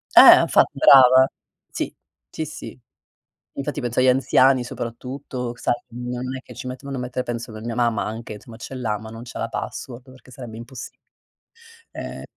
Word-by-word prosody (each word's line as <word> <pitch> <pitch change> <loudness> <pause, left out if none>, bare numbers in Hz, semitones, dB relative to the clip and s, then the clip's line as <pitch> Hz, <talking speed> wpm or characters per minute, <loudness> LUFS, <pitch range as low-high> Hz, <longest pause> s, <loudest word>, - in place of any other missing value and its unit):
Eh, - - +10
infatti - - +2
brava. 130 -1 +8 0.5
Sì, - - -4 0.4
sì, 160 - -4
sì. 155 -4 -9 0.8
Infatti 145 +1 -4
penso 120 -2 -3
agli 130 - +4
anziani 130 0 +4
soprattutto, 125 +1 -6
sai, - - 0
non 125 +2 -5
è 130 - -7
che - - -13
ci - - -8
metto 130 +2 -8
vanno 135 -2 -4
a - - -3
mettere 125 0 -3
penso 120 -1 -5
per 110 0 -9
mia 115 -1 -3
mamma 120 -3 +1
anche, 110 -1 -6
somma 115 +1 -13
ce 130 - -9
l'ha, 110 -4 -2
ma 110 0 -10
non 115 +1 -9
c'ha 120 - -8
la - - -2
password 125 0 -6
perché 130 0 -18
sarebbe 120 -3 -9
impossi 120 +1 -9 1.0
ehm - - -7
125 Hz, 180 wpm, -22 LUFS, 115-130 Hz, 1.0 s, Eh